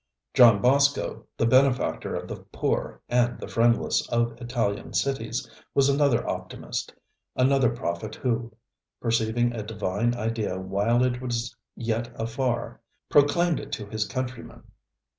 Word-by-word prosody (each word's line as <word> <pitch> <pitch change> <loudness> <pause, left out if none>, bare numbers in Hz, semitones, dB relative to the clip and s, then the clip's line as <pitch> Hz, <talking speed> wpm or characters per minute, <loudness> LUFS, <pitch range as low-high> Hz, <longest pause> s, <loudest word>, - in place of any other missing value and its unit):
John 115 -5 +7
Bosco, 140 +3 +2
the - - +2
benefactor 130 +1 +2
of - - -4
the - - -5
poor - - -3
and 120 0 +2
the - - -6
friendless 115 0 +2
of 120 0 +1
Italian 120 -4 -2
cities, 130 -2 -1 0.3
was 140 0 +4
another 140 -4 +2
optimist, - - -4 0.4
another 130 -1 +4
prophet 110 -2 -4
who, 120 -2 -1 0.5
perceiving 115 +1 +1
a 115 - -4
Divine 105 +2 -1
Idea 110 -5 -2
while 100 +6 +1
it 125 -1 0
was 120 -2 -3 0.2
yet 120 +1 -2
afar, 120 +1 -2 0.3
proclaimed 150 +4 +4
it 140 - -9
to 105 - -3
his 105 +1 -2
countrymen. 130 -2 -5
120 Hz, 130 wpm, -26 LUFS, 115-130 Hz, 0.5 s, John